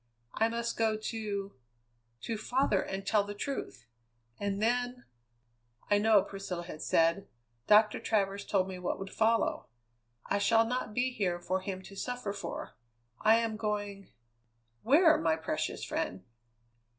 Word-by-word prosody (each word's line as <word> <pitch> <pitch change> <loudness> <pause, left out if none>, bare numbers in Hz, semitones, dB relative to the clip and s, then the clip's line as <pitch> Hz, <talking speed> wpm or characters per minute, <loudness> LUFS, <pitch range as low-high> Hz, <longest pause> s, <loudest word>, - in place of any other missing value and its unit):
I 225 +1 +2
must 235 0 -2
go 220 -1 +2
to 210 -3 -4 0.7
to 225 - -3
father 220 -2 +1
and 195 0 -5
tell 210 0 +3
the 205 0 -7
truth, 205 - -5 0.5
and 200 -1 -2
then 245 +2 0 0.4
" 115 - -31
"I 205 - +5
know," 210 -2 +5
Priscilla 195 -3 -5
had 160 -3 -9
said. 165 +4 +2 0.4
"Doctor 215 0 +5
Travers 200 -2 0
told 190 -2 +1
me 185 -1 -6
what 180 - -2
would 195 -1 -7
follow. 225 +1 +1 0.6
I 200 - 0
shall 225 +2 +4
not 230 -3 -3
be 255 +1 +1
here 185 -7 -1
for 185 +2 -1
him 190 -1 -5
to 195 - -12
suffer 245 -1 -3
for; 205 - -6 0.5
I 220 +1 +5
am 225 -1 0
going 205 -2 -3 0.4
" 115 0 -44
"Where, 315 +5 +5
my 160 -1 +2
precious 160 - -3
friend?" 95 +1 -3
205 Hz, 150 wpm, -31 LUFS, 190-225 Hz, 0.7 s, I